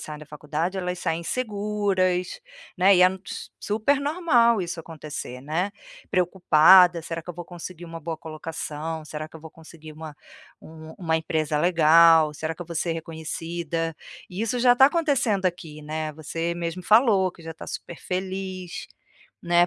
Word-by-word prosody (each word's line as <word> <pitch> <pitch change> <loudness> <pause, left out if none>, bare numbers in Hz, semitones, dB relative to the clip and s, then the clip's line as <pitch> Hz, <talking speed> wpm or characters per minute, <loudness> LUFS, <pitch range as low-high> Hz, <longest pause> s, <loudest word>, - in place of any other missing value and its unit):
saem 150 -1 -7
da 150 - -12
faculdade 155 +5 -3
elas 180 -1 -3
saem 165 -1 -1
inseguras, 200 -4 -1 0.4
né, 190 +1 +6
e 180 - +6
é - - +9
n 190 0 -2
s - - -7
super 220 +7 +1
normal 280 - +3
isso 170 -1 -5
acontecer, 150 -5 -7
né, 165 +7 -1 0.4
preocupada: 180 -1 +5
"Será 165 +1 -5
que - - -20
eu - - -10
vou 175 +1 -7
conseguir 175 0 -9
uma 165 -1 -8
boa 165 0 -4
colocação, 160 0 -6
será 155 +1 -6
que 160 - -12
eu - - -14
vou 160 0 -11
conseguir 160 -1 -13
uma 155 -1 -9 0.5
um 160 0 -11
uma 160 -3 0
empresa 155 -1 -1
legal, 165 -1 +6
será 160 +2 -4
que 175 - -7
eu - - -14
vou 170 - -6
ser 165 +1 0
reconhecida?". 165 0 -4 0.4
E 180 - -5
isso 230 +2 -1
já 245 0 +5
tá 265 +2 +7
acontecendo 275 - +1
aqui, 165 -4 -3
né, 155 +1 -3
você 165 +2 -3
mesmo 170 +1 -4
falou 210 -2 +4
que 170 - -17
já 165 - -7
tá 160 - -11
super 170 - -7
feliz, 185 -1 -4 0.6
né, 175 0 +4
170 Hz, 175 wpm, -25 LUFS, 160-190 Hz, 0.6 s, é